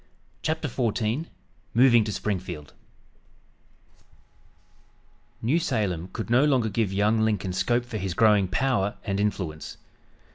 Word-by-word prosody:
CHAPTER 155 -1 -1
XIV 120 +3 -1 0.5
MOVING 120 -2 +6
TO 105 - -3
SPRINGFIELD 90 -8 -4 2.7
New 140 +9 +2
Salem 100 - -1
could 115 +1 -5
no 125 +4 +5
longer 130 -7 +2
give 105 -1 0
young 105 +3 +2
Lincoln 105 -4 0
scope 120 +6 +1
for 120 -3 -5
his 95 -2 -3
growing 105 -3 +4
power 110 -1 0
and 100 0 -2
influence. 95 -7 -3
110 Hz, 115 wpm, -26 LUFS, 95-120 Hz, 2.7 s, MOVING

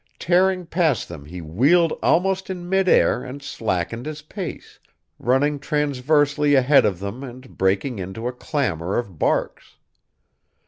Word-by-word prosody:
Tearing 185 +1 +2
past 165 - 0
them 80 -4 -10
he 90 +4 -8
wheeled 140 - +3
almost 190 +2 +1
in 180 -2 -5
midair 190 -8 +3
and 135 +2 -7
slackened 115 - -3
his 150 -1 -6
pace, 180 +2 -8 0.4
running 140 +4 +1
transversely 145 0 +1
ahead 135 0 +5
of 95 -4 -2
them 100 +7 -6
and 130 0 -11
breaking 100 +5 0
into 95 +6 -5
a 125 - -3
clamor 100 - -2
of 100 -10 -4
barks. - - -1
140 Hz, 135 wpm, -22 LUFS, 105-160 Hz, 0.4 s, ahead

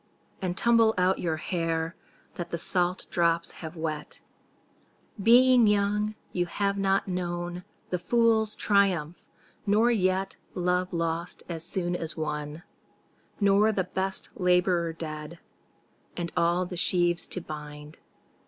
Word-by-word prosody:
And 180 -1 -2
tumble 230 -1 +4
out 185 +1 +2
your 160 -2 -1
hair 165 -1 -2 0.4
That 175 -1 -6
the 170 - -3
salt 180 +2 +1
drops 170 -1 +1
have 160 0 -7
wet; 155 -2 -4 1.0
Being 245 +2 +6
young 210 +1 +1 0.2
you 175 -1 -1
have 200 +3 -1
not 195 0 +1
known 175 -1 -3 0.3
The 180 - 0
fool's 220 +2 +2
triumph, 185 -6 +1 0.5
nor 220 +4 +4
yet 190 -3 0 0.2
Love 180 0 0
lost 170 0 -3
as 165 -2 -4
soon 175 0 -1
as 165 -2 -5
won, 150 +1 -4 0.8
Nor 200 +1 +4
the 195 -3 0
best 190 +1 -3
labourer 180 -2 +2
dead 155 0 -7 0.8
And 170 -1 -3
all 175 +2 +2
the 180 0 -7
sheaves 175 -1 +2
to - - -2
bind. 150 -2 -9
180 Hz, 125 wpm, -27 LUFS, 165-195 Hz, 1.0 s, Being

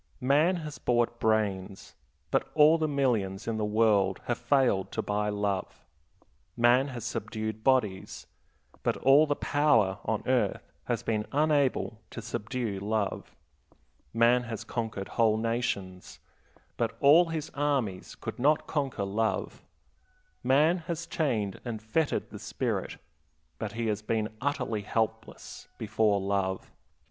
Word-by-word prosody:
Man 145 +8 +3
has 155 -4 -6
bought 120 -1 +1
brains, 100 -4 -1 0.4
but - - +1
all 155 +2 +6
the 155 - +1
millions 115 -9 0
in 115 -1 -1
the 110 - -1
world 105 -3 +2
have 120 - -1
failed 120 -6 +2
to - - -2
buy 105 0 -1
love. 100 -2 -3 0.7
Man 120 +3 +4
has 120 -5 -6
subdued 110 0 -4
bodies, 110 -8 0 0.6
but - - 0
all 140 +4 +5
the 145 - +1
power 120 -13 +2
on - - -2
earth - - 0
has - - -2
been 105 -2 -1
unable 140 -6 +1
to - - -8
subdue 115 -1 -3
love. 105 0 -2 0.8
Man 120 +2 +4
has 115 -1 -5
conquered 110 -4 -4
whole 110 -2 +2
nations, 110 -5 -3 0.6
but - - -1
all 155 +5 +7
his 160 -2 -4
armies 140 -10 -1
could - - -7
not 150 +4 +3
conquer 135 -9 -2
love. 110 +3 -2 0.8
Man 150 +7 +4
has 170 0 -5
chained 115 - -1
and 115 -3 -4
fettered 125 +9 -1
the - - -8
spirit, - - -3 0.6
but 110 -2 -4
he 115 0 -3
has 105 -1 -1
been 110 0 -2
utterly 125 -6 -1
helpless 110 +1 -4
before 110 -1 +1
love. 95 -1 -2
115 Hz, 135 wpm, -29 LUFS, 105-140 Hz, 0.8 s, all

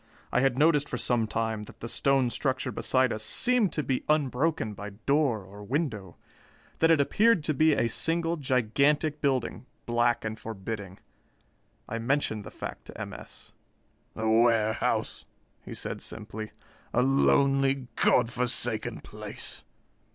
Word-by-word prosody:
I - - +2
had 135 -2 +2
noticed 150 -1 +3
for - - -3
some 115 -3 +1
time 110 -1 -2
that - - -15
the 115 - -6
stone 135 0 +1
structure 130 -1 -1
beside 130 -1 +2
us 110 - -4
seemed 225 - +3
to 150 - -1
be 130 -2 -1
unbroken 145 -4 +1
by 105 +1 -7
door 120 +1 0
or 100 +2 -11
window 110 - -3 0.6
that 165 - +4
it 165 -2 +5
appeared 205 +5 +3
to 155 - 0
be 155 +2 +4
a 115 - +2
single 165 +7 -1
gigantic 140 +3 +1
building, 130 -2 -1 0.2
black 120 -1 +1
and 110 0 -4
forbidding. 100 -3 -6 0.9
I 115 - -4
mentioned 115 -3 0
the - - -7
fact - - -8
to - - -11
M. - - -5
S. - - -11 0.6
"The 110 0 -2
warehouse," 110 -1 +2 0.4
he - - -8
said - - -5
simply. 110 0 -7 0.4
"A 125 - +4
lonely, 135 0 +3
God 120 -1 +3
forsaken 120 -2 0
place. - - -5
125 Hz, 145 wpm, -28 LUFS, 110-145 Hz, 0.9 s, it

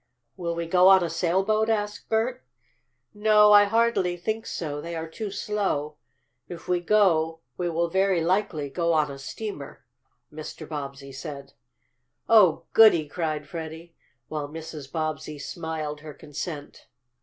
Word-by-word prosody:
"Will 170 -2 -3
we 170 0 -3
go 180 +2 +5
on 190 -1 +7
a 170 - -2
sailboat?" 195 +5 +1
asked 210 -1 -2
Bert. 225 - 0 0.7
"No, 210 0 +5
I 205 0 +8
hardly 215 -5 +1
think 220 +5 -3
so. 145 -3 -4
They 170 +1 -6
are 165 0 -4
too 210 +6 -5
slow. 190 -8 -2 0.5
If 170 -1 -9
we 180 -1 +1
go 165 -4 +2
we 175 -1 -2
will, 170 +1 0
very 190 +1 +2
likely, 165 -3 0
go 170 +2 +1
on 155 -2 +2
a 135 - -9
steamer," 145 0 -7 0.5
Mr. 155 0 -8
Bobbsey 140 -2 -6
said. 140 0 -8 0.7
"Oh, 185 -8 +5
goody!" 190 -9 +6
cried 155 -1 -3
Freddie, 165 +1 -8 0.3
while 150 -2 -4
Mrs. 155 -3 -8
Bobbsey 155 -2 -3
smiled 155 -1 -5
her 150 -1 -10
consent. 150 0 -7
170 Hz, 145 wpm, -26 LUFS, 155-195 Hz, 0.7 s, I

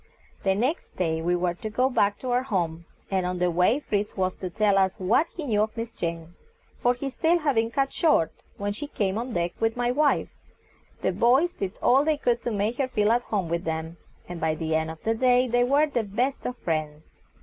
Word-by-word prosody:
The 190 -1 +2
next 255 - -2
day 160 -3 0
we 175 +2 +1
were 175 0 0
to 215 +5 -6
go 250 +4 +2
back 205 -6 +1
to 255 - -3
our 245 +1 +3
home, 170 -9 -2 0.3
and 190 -1 +1
on 180 0 -2
the 180 0 +1
way 180 - +3
Fritz 210 -8 -2
was 185 -1 0
to 185 - -5
tell 205 +1 +2
us 190 -1 +2
what 220 - +2
he 320 - -4
knew 210 -5 +1
of 215 +2 -2
Miss 230 0 -4
Jane, 165 0 -4 0.5
for 245 0 +3
his 270 +1 -5
tale 335 +2 +3
had 300 -4 +1
been 225 -1 +1
cut 270 +3 0
short 170 - +3 0.3
when 205 0 -2
she 285 +8 -6
came 200 -6 -1
on 240 - -3
the 250 - -7
deck 175 0 0
with 225 +1 0
my 245 0 +1
wife. 290 +2 +2 0.7
The - - +2
boys 265 +9 +3
did 195 -1 -4
all 265 +3 +5
they 310 0 +1
could 240 -4 0
to 240 - -2
make 215 +3 -1
her 270 - +2
feel 210 -4 +1
at 240 +1 +3
home 200 -7 -2
with 170 +1 -2
them, 160 0 -4 0.3
and 175 -1 -7
by 160 0 +1
the 160 0 -2
end 160 0 +1
of 160 0 -9
the 225 - +1
day 250 +2 +3
they 245 0 +2
were 280 +5 +4
the 275 -6 -1
best 245 +7 -2
of 250 0 -5
friends. 155 -2 -3
215 Hz, 240 wpm, -26 LUFS, 175-250 Hz, 0.7 s, all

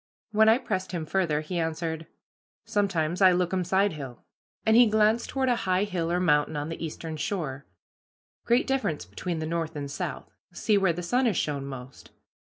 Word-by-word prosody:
When 220 +1 +5
I 225 - +6
pressed 190 -7 -3
him 165 -3 -2
further 155 -3 0
he 175 +3 -3
answered, 160 0 -3 0.6
"Sometimes 180 -4 0
I 185 -1 +7
lookum 180 +1 +1
sidehill," 165 -9 -1 0.4
and 220 0 +4
he 240 -1 +7
glanced 215 +2 +2
toward 265 -1 0
a 245 - +3
high 185 +2 +3
hill 175 -5 -2
or 175 - +1
mountain 150 -4 +2
on 145 +2 -3
the 165 - -5
eastern 160 0 -5
shore; 145 -4 -3 0.8
"great 240 +2 +3
difference 260 - -1
between 165 - -4
the 160 - -3
north 165 0 -2
and 140 -1 -5
south; - - -5 0.2
see 215 - +1
where 195 -3 +3
the 175 +2 -5
sun 245 +9 +2
has 210 - +1
shone 140 -2 -1
most. 130 -1 -9
175 Hz, 180 wpm, -27 LUFS, 155-205 Hz, 0.8 s, I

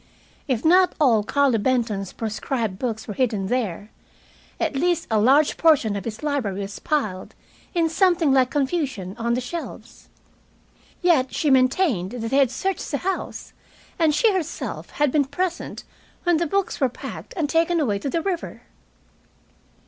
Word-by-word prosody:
If 255 -2 -1
not 365 +3 +5
all 240 -8 +4
Carlo 275 -1 +2
Benton's 220 -5 0
proscribed 220 -2 -3
books 225 -4 -3
were 210 - -4
hidden 215 -6 -1
there, 215 -5 -2 0.7
at - - -1
least 345 +4 +1
a 220 - +3
large 275 +7 +4
portion 285 -11 +3
of 200 - -5
his 225 +4 -6
library 250 -10 -1
was 200 0 -6
piled, 210 -12 -2 0.4
in 335 -1 +3
something 335 -3 +3
like 260 -2 +4
confusion, 270 - -2
on 235 +1 0
the - - 0
shelves. 330 +7 -8 0.9
Yet 310 -8 +3
she 295 - +1
maintained 255 - +2
that 230 -2 -4
they 270 - +3
had 275 -3 +4
searched 380 +8 -3
the 285 - -1
house, 380 +6 -4 0.5
and 315 -3 +3
she 440 +5 +3
herself 335 -4 -4
had 295 -2 0
been 290 -1 +2
present 355 +5 -3 0.4
when 350 -2 +3
the 335 +1 0
books 395 -1 -1
were 265 - +3
packed 245 - -9
and 315 -4 +1
taken 330 +2 +2
away 215 -10 0
to 275 - -3
the 330 +4 -1
river. 360 -3 -4
270 Hz, 160 wpm, -23 LUFS, 225-330 Hz, 0.9 s, not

